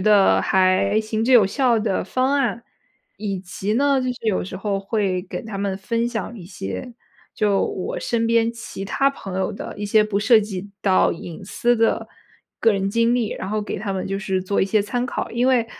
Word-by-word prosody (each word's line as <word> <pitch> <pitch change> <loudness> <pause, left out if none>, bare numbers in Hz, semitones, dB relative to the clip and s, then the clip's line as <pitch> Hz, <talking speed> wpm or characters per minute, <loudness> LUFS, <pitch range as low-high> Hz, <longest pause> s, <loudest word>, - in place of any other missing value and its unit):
得 205 0 +5
还 190 +2 +3
行 220 0 -2
之 260 - 0
有 225 -6 +7
效 240 +2 +2
的 210 -3 -1
方 255 +7 0
案。 240 -4 0 0.6
以 200 -2 -3
及 190 +2 -4
呢， 280 +1 +3
就 255 - -1
是 230 - -9
有 205 - +1
时 185 0 -7
候 200 -1 -1
会 195 -2 -1
给 185 - -6
他 220 -4 -7
们 195 -1 -2
分 230 +4 -1
享 230 0 -4
一 180 - -10
些， 190 - -6 0.4
就 205 -2 +2
我 185 - -4
身 230 -1 0
边 230 0 +2
其 230 -4 -7
他 275 +7 +2
朋 195 -9 -6
友 190 - 0
的 - - -7
一 205 - -3
些 215 +1 +4
不 205 -1 -1
涉 225 +1 +6
及 205 -2 -4
到 190 -2 +3
隐 170 +1 -8
私 240 +5 +1
的 225 -1 +1 0.5
个 225 - +5
人 195 0 -1
经 230 +2 +2
历， 235 -4 0
然 190 - -5
后 215 0 -1
给 205 - -4
他 200 +1 -4
们 190 - -3
就 195 +1 -2
是 190 -1 -1
做 200 +2 0
一 - - +2
些 205 +1 +2
参 245 +5 -2
考。 - - -4
因 240 +2 +1
为， 250 -3 +3
210 Hz, 230 characters per minute, -22 LUFS, 195-230 Hz, 0.6 s, 有